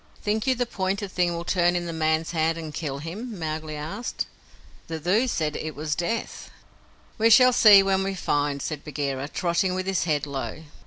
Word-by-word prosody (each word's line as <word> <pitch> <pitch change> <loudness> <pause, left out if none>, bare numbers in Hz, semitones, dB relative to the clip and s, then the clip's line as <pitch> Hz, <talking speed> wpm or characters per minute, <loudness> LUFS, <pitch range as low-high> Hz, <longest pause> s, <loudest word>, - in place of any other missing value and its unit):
"Think 215 +4 -1
you 260 - +3
the 245 0 0
pointed 195 -2 -2
thing 175 -2 +1
will 170 0 -5
turn 175 -1 +2
in 175 0 -1
the 170 - -4
man's 160 0 0
hand 165 0 +1
and 160 -2 -7
kill 145 -4 -4
him?" 200 - -6
Mowgli 155 -1 -4
asked. 165 +11 -4 0.6
"The 160 -1 -4
Thuu 195 +10 +2
said 155 -8 -1
it 155 -1 -5
was 150 +1 -2
Death." 175 +9 -3 0.7
"We 225 +1 +5
shall 255 +2 +7
see 205 -4 +8
when 195 0 +1
we 195 0 -2
find," 145 -5 -1
said 150 -3 -4
Bagheera, 140 -2 -3
trotting 180 +3 0
with 185 0 -2
his 190 -3 0
head 150 -4 0
low. 140 +2 -5
170 Hz, 195 wpm, -25 LUFS, 155-195 Hz, 0.7 s, see